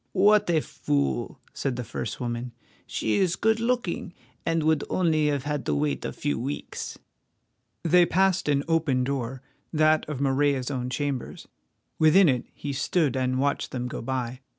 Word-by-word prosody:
"What 205 +1 +4
a 160 -2 +3
fool!" 70 - -2
said 135 -3 -2
the 125 - -3
first 115 - -5
woman. 120 -1 -4 0.3
"She 110 -1 0
is 180 -2 +2
good 220 +2 +2
looking, 230 -7 -1 0.3
and 165 -1 +1
would 155 -1 +2
only 160 -4 +2
have 145 -3 0
had 150 0 -2
to - - +1
wait 145 0 -1
a - - -3
few 145 -5 -2
weeks." 135 +5 -5 0.9
They 175 +1 +5
passed 190 -2 +2
an 140 -1 +2
open 160 -6 +2
door, 130 -1 -3 0.3
that 155 -1 +3
of 145 -4 -4
Morella's 140 -1 +1
own 125 -2 -2
chambers. 140 0 -3 0.5
Within 170 +4 +6
it 125 -2 0
he 145 -1 -4
stood 145 0 +1
and 130 0 0
watched 140 +1 0
them 125 -1 -3
go - - -5
by. 125 0 -3
145 Hz, 165 wpm, -26 LUFS, 130-165 Hz, 0.9 s, Within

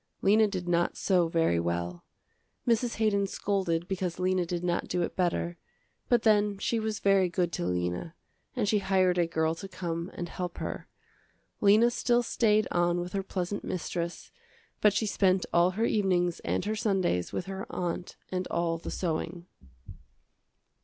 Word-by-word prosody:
Lena 215 +2 +5
did 185 -3 -4
not 175 0 +1
sew 180 -3 +2
very 165 - +2
well. 85 +1 -3 0.6
Mrs. 235 0 +2
Haydon 205 -2 +2
scolded 180 -4 -1
because 185 -3 -2
Lena 185 -1 +1
did 175 0 -3
not 175 -1 0
do 180 -1 0
it - - -4
better, 175 -1 0 0.5
but 240 -2 +3
then 210 -2 +3
she 225 +3 0
was 220 -1 -2
very 195 -2 +3
good 175 -1 0
to 85 - -2
Lena, 90 - -2 0.4
and 230 -5 0
she 210 +1 +3
hired 185 -2 +2
a 170 - +3
girl 160 -1 0
to 165 +4 -8
come 170 -2 -4
and 175 - -4
help 180 0 -5
her. - - -5 0.7
Lena 215 +4 +5
still 240 0 +2
stayed 215 -2 +2
on 175 0 +2
with 175 0 -5
her 195 - 0
pleasant 190 +1 -3
mistress, 170 -1 -4 0.5
but 210 - +6
she 210 +2 0
spent 190 -2 +2
all 175 +1 +5
her 225 - +2
evenings 180 -5 +1
and - - -2
her 215 +1 -1
Sundays 190 - 0
with 180 - -3
her 195 0 -6
aunt 175 0 -3 0.2
and 185 0 -2
all 165 -1 -1
the - - -6
sewing. 170 0 -3
180 Hz, 165 wpm, -29 LUFS, 170-200 Hz, 0.7 s, but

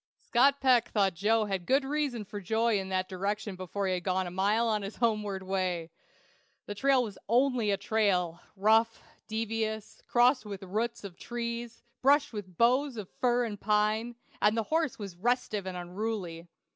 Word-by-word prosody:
Scott 275 +3 +3
Peck 255 -3 +4
thought 195 -3 +2
Joe 215 +5 +2
had 190 -4 -3
good 270 +1 +3
reason 275 -6 -1
for 205 +1 -7
joy 220 +2 +1
in 190 0 -5
that 185 -1 0
direction 200 +2 -3
before 185 +2 -4
he 190 - +1
had 180 -1 -2
gone 185 0 0
a 175 - -5
mile 205 +5 +2
on 215 -2 +1
his 200 +2 -6
homeward 210 -4 0
way! 185 -3 -2 0.7
The 205 - -5
trail 265 +4 +3
was 210 -5 -7
only 245 -2 +3
a 200 - +2
trail, 195 -5 0
rough, 220 +3 +3 0.2
devious, 220 -1 -3
crossed 250 +1 +4
with 200 -3 -7
roots 225 +5 -2
of 185 -3 -9
trees, 235 -1 -5 0.2
brushed 285 0 +4
with 185 -5 -7
boughs 255 +2 +3
of 205 -4 -7
fir 245 -1 +2
and 205 -3 -6
pine, 215 +3 +1 0.3
and 210 +2 +3
the 225 - +1
horse 320 -4 +1
was 195 -4 -7
restive 215 -2 0
and 185 -1 -4
unruly. 180 -2 -4
215 Hz, 175 wpm, -30 LUFS, 190-235 Hz, 0.7 s, Peck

